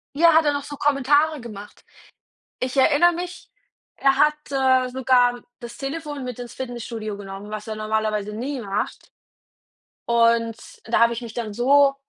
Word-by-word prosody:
Ja, 335 +2 +6
hat 320 - +5
er 295 - +3
noch 285 -1 -3
so 290 - -8
Kommentare 290 +2 +2
gemacht. 210 -3 -11 0.8
Ich 255 +2 -3
erinnere 310 +6 +5
mich, 355 +1 -7 0.5
er 275 -1 +3
hat, 300 +2 +4 0.2
äh, 260 -1 +3
sogar 250 -1 +2 0.2
das 235 -1 -9
Telefon 290 0 -5
mit 250 -2 -6
ins 245 -1 -8
Fitnessstudio 230 -4 -5
genommen, 200 +1 -9
was 215 0 -6
er 220 -1 -5
normalerweise 215 -1 -1
nie 255 +5 -4
macht 200 -2 -4 1.0
und 230 -1 +3 0.3
da 230 - +1
habe 235 0 +5
ich 235 - -5
mich 230 -2 -8
dann 225 -3 -4
so 275 +4 +4
245 Hz, 160 wpm, -23 LUFS, 225-280 Hz, 1.0 s, Ja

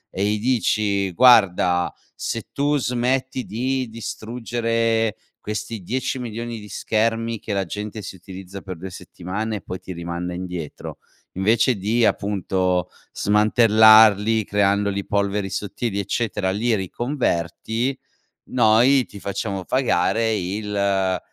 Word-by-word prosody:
e 95 - 0
gli 105 +1 0
dici, 105 -5 +1
guarda, 90 -6 +4 0.2
se - - -4
tu 145 +1 +1
smetti 125 +2 -1
di 130 +3 -2
distruggere, 115 -1 -1 0.2
questi 105 +1 -5
dieci 130 +7 -2
milioni 115 -1 -5
di 105 - -11
schermi 115 +1 -1
che 105 - -5
la 100 -1 0
gente 105 +4 -6
si 95 - -8
utilizza 95 +1 -10
per 95 -3 -7
due 95 +3 -7
settimane 105 +6 -5
e 100 - -9
poi 90 - -7
ti - - -9
rimanda 85 +1 -4
indietro, 90 -4 -6 0.4
invece 115 +6 +2
di 110 +4 +1
appunto 95 -3 0 0.2
smantellarli, 110 0 +5
creandoli 100 0 +1
polveri 100 -1 -1
sottili, 100 +2 -3
eccetera, 100 -1 -1
li 115 +4 0
riconverti, 115 - -2 0.5
noi 125 +3 +4
ti 100 - -12
facciamo 100 -1 -3
pagare 110 -2 +1
il 100 -1 -1
105 Hz, 120 wpm, -22 LUFS, 95-115 Hz, 0.5 s, smantellarli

